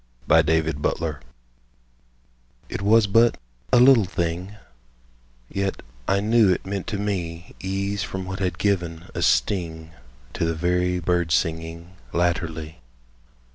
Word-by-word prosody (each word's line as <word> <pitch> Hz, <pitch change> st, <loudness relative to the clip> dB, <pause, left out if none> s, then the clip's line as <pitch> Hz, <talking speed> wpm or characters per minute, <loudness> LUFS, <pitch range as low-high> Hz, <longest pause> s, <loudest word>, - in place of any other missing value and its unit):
THE -, -, +6 dB
PEACE 80 Hz, 0 st, +1 dB
OFFERING 80 Hz, -4 st, -1 dB, 1.5 s
IT -, -, -4 dB
was 110 Hz, +2 st, +5 dB
but 115 Hz, +3 st, +4 dB, 0.3 s
a 125 Hz, -, +6 dB
little 125 Hz, -4 st, +7 dB
thing, 90 Hz, +2 st, -3 dB, 0.9 s
Yet 100 Hz, +4 st, -3 dB, 0.2 s
I 100 Hz, -, +2 dB
knew 110 Hz, -1 st, +4 dB
it 90 Hz, -, -1 dB
meant 100 Hz, -1 st, -4 dB
to 105 Hz, -, -2 dB
me 90 Hz, -5 st, -4 dB
Ease 100 Hz, +1 st, -2 dB
from 95 Hz, -1 st, -4 dB
what 95 Hz, +1 st, -5 dB
had 90 Hz, -3 st, -1 dB
given 85 Hz, -4 st, -1 dB
a -, -, -3 dB
sting 80 Hz, +6 st, 0 dB, 0.4 s
To -, -, -2 dB
the 80 Hz, 0 st, 0 dB
very 90 Hz, +2 st, +1 dB
birdsinging 85 Hz, -1 st, -1 dB, 0.2 s
Latterly. 80 Hz, -3 st, -1 dB
90 Hz, 125 wpm, -24 LUFS, 80-100 Hz, 1.5 s, little